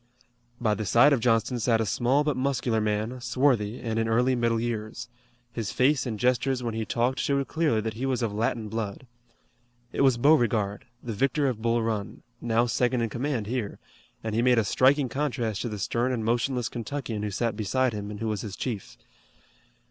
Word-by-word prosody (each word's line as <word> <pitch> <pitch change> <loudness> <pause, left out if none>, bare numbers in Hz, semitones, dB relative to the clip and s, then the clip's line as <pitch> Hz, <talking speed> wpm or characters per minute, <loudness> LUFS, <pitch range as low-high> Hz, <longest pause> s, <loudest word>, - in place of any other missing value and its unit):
By 110 -3 +2
the 110 - -3
side 120 +8 +5
of 135 - +2
Johnston 115 +1 +1
sat 115 0 +2
a 110 - +1
small 125 +8 +2
but 150 -2 0
muscular 130 -4 0
man, 110 +4 -2
swarthy, 120 -3 +1
and 115 -2 -2
in 115 - 0
early 125 +3 +2
middle 115 -1 +1
years. 115 0 -4 0.4
His 115 -4 -3
face 135 +1 +2
and 110 -3 -4
gestures 125 +1 +1
when 115 -2 -2
he 110 0 -2
talked 125 +4 0
showed 140 -1 0
clearly 155 -9 +1
that 110 0 -3
he 125 +5 -3
was 130 -2 0
of 110 -3 -1
Latin 110 +1 -1
blood. 110 +2 -4 0.9
It - - -1
was 135 -3 +4
Beauregard, 115 -7 +2 0.2
the 115 - -4
victor 135 +6 +1
of 120 -4 -2
Bull 115 0 +1
Run, 110 -3 -3 0.2
now 115 0 +2
second 125 +1 +1
in 115 - -1
command 120 -1 -2
here, 115 -2 -3 0.5
and 110 -1 -3
he 115 - +2
made 125 0 +4
a 115 - +4
striking 135 +6 +3
contrast 120 -5 -2
to 120 - -2
the 105 - -5
stern 120 +6 0
and 115 -4 -2
motionless 120 +1 0
Kentuckian 120 -2 -4
who 105 - -2
sat 110 +2 -1
beside 120 +4 0
him 105 -1 -5
and 105 -1 -7
who 115 - -2
was 105 -2 -2
his 100 -3 -6
chief. 110 -7 -5
120 Hz, 200 wpm, -27 LUFS, 110-130 Hz, 0.9 s, side